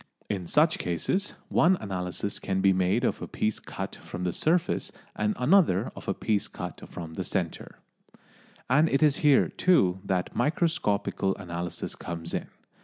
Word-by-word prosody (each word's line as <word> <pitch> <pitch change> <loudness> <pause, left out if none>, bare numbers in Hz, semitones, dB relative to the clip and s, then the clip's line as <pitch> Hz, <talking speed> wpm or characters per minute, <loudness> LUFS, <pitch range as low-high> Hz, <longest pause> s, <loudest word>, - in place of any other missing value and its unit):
In 95 -4 -3
such 155 - +3
cases, 90 - -1
one 180 +3 +4
analysis 95 - -3
can 95 -1 -1
be 95 0 +4
made 95 0 +1
of - - 0
a - - -4
piece 110 0 -1
cut - - -6
from 90 - -7
the 90 -1 0
surface 170 - +1 0.2
and 105 0 0
another 135 - +3
of - - -10
a - - 0
piece 105 -2 0 0.4
from 80 -2 -8
the - - -3
centre. - - -3 0.9
And 150 +6 +4
it 140 +3 +2
is 145 -2 +4
here, 145 -2 +5
too, 95 - +3
that 95 -2 -1
microscopical 145 - 0
analysis 85 -2 -5
comes 85 -1 -6
in. - - -2
100 Hz, 155 wpm, -27 LUFS, 90-150 Hz, 0.9 s, here